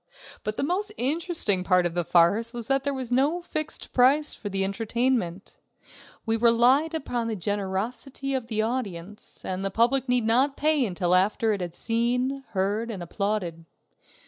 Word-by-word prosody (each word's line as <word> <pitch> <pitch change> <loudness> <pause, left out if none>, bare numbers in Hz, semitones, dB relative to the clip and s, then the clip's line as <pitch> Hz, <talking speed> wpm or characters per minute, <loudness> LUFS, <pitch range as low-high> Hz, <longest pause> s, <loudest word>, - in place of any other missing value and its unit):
But 215 0 -3
the - - -1
most 375 +7 -1
interesting 280 - +2
part 180 -1 +3
of 175 - -1
the 175 0 0
farce 200 +9 +3
was 235 -2 -2
that 270 0 +2
there 280 - 0
was 255 -2 -5
no 280 +7 +2
fixed 310 -3 -4
price 275 +4 +3
for 205 - -6
the 195 0 0
entertainment. 220 -2 -1 0.7
We 225 0 +1
relied 245 +7 +4
upon 245 -6 -2
the 225 - -2
generosity 205 - -3
of 255 -3 -2
the 220 -2 0
audience, 210 -5 -5
and 185 +1 -3
the 195 - 0
public 245 +5 +1
need 250 -2 +2
not 260 +5 +3
pay 305 -2 +2
until 180 -1 -1
after 210 +4 +2
it 200 - -3
had 175 -1 -5
seen, 250 +4 -1
heard, 205 +4 -1
and 195 -6 -5
applauded. 180 -3 -3
230 Hz, 170 wpm, -26 LUFS, 195-265 Hz, 0.7 s, relied